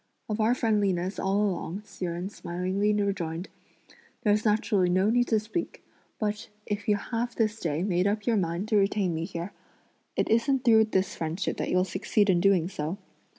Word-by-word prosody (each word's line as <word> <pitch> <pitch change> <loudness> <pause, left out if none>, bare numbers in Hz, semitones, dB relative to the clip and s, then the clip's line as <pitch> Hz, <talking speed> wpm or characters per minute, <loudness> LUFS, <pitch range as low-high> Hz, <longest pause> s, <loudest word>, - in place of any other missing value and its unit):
"Of 215 0 -3
our 230 +3 +3
friendliness 200 -5 0
all 195 +2 +1
along," 195 0 -3
Hsi 190 - -6
Jen 175 +1 -3
smilingly 185 +2 -1
rejoined, 195 -4 -1 0.7
"there's 210 0 +2
naturally 210 -3 +2
no 185 +4 +3
need 245 +1 +2
to 220 - +3
speak; 220 +11 -5 0.3
but, 210 0 -3 0.2
if 205 -1 -4
you 210 - +4
have 230 +3 -3
this 220 -1 0
day 160 -2 -1
made 185 -1 +1
up 210 +1 -1
your 230 -3 +2
mind 175 +2 -1
to 215 - +3
retain 195 -2 +2
me 165 +1 -2
here, 175 +1 -5 0.6
it - - +1
isn't 255 +3 +2
through 220 -2 +6
this 195 -3 0
friendship 165 +4 -2
that - - -2
you'll 180 0 +3
succeed 195 +2 +1
in 175 -1 +2
doing 185 -3 +3
so. 165 0 -4
200 Hz, 180 wpm, -27 LUFS, 180-215 Hz, 0.7 s, through